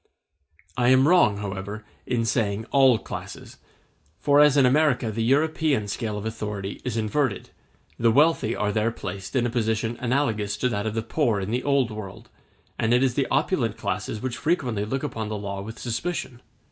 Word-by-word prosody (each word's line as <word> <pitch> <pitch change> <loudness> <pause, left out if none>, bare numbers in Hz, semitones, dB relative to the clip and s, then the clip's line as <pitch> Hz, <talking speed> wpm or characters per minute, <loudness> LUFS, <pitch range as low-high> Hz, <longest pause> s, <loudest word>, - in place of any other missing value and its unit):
I 120 -1 +2
am 130 +2 +5
wrong, 165 - +4
however, 100 +1 -6 0.2
in 120 -2 0
saying 110 -1 0
all 135 -4 +5
classes; - - -8 0.6
for 145 +5 +4
as 150 -1 +6
in 135 - +6
America 130 -4 +2
the 115 +2 -3
European 145 -2 +1
scale 105 0 -3
of 105 - -6
authority 105 -3 -5
is 115 - -3
inverted, 110 0 -1 0.5
the 115 - +4
wealthy 140 -2 +3
are 105 -1 0
there 110 +1 +1
placed 100 -1 -7
in 125 -2 +2
a 120 - -1
position 110 0 -1
analogous 120 -5 0
to 125 - 0
that 105 -2 -2
of 110 - -3
the 115 - -1
poor 115 -3 0
in 95 +2 -4
the 125 +2 0
Old 140 -4 +1
World, 110 +2 -8 0.5
and 115 +2 +3
it 125 - +3
is 130 -2 +2
the 135 +1 0
opulent 135 - 0
classes 105 +1 -3
which 130 -2 -3
frequently 130 - 0
look 130 +6 -3
upon 115 -7 -4
the 105 - -3
law 100 -1 -5
with 110 +3 -8
suspicion. 125 0 -4
115 Hz, 185 wpm, -25 LUFS, 105-135 Hz, 0.6 s, as